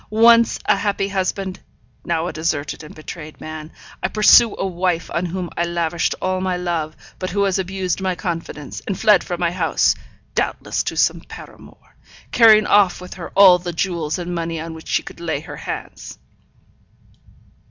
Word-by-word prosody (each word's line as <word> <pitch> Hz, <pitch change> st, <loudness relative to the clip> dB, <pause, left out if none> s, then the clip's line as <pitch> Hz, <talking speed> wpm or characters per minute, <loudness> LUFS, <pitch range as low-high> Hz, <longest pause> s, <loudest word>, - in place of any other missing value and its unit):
Once 230 Hz, +2 st, +5 dB
a -, -, +4 dB
happy 200 Hz, -1 st, -1 dB
husband, 190 Hz, 0 st, -2 dB, 0.4 s
now 165 Hz, -1 st, -1 dB
a -, -, -4 dB
deserted 155 Hz, -2 st, -2 dB
and 150 Hz, -, -12 dB
betrayed 155 Hz, 0 st, -9 dB
man, 155 Hz, 0 st, -8 dB, 0.3 s
I -, -, +1 dB
pursue 215 Hz, +1 st, +6 dB
a -, -, -2 dB
wife 180 Hz, -2 st, -1 dB
on 175 Hz, +1 st, -1 dB
whom 180 Hz, 0 st, -4 dB
I 170 Hz, -, 0 dB
lavished 170 Hz, -1 st, -1 dB
all 185 Hz, 0 st, -1 dB
my 185 Hz, -1 st, -1 dB
love, 170 Hz, -3 st, -3 dB, 0.2 s
but 185 Hz, -, -3 dB
who 200 Hz, +2 st, 0 dB
has 195 Hz, -1 st, +1 dB
abused 190 Hz, -1 st, -2 dB
my 185 Hz, -1 st, -1 dB
confidence, 165 Hz, -5 st, -5 dB
and 195 Hz, -, -3 dB
fled 210 Hz, -, +5 dB
from 175 Hz, -2 st, -4 dB
my 170 Hz, -1 st, +1 dB
house, 175 Hz, -2 st, +2 dB, 0.4 s
doubtless -, -, -1 dB
to -, -, -3 dB
some -, -, +2 dB
paramour; -, -, -14 dB, 0.4 s
carrying 220 Hz, -3 st, +6 dB
off 200 Hz, -3 st, +4 dB
with 180 Hz, 0 st, -9 dB
her 175 Hz, -3 st, -8 dB
all 190 Hz, -2 st, +8 dB
the 175 Hz, 0 st, -5 dB
jewels 165 Hz, -3 st, -2 dB
and 175 Hz, 0 st, -4 dB
money 165 Hz, -1 st, -3 dB
on 165 Hz, +1 st, -6 dB
which 160 Hz, 0 st, -11 dB
she -, -, 0 dB
could -, -, -11 dB
lay 160 Hz, -4 st, -2 dB
her -, -, -9 dB
hands. -, -, -7 dB
180 Hz, 175 wpm, -20 LUFS, 165-190 Hz, 0.4 s, all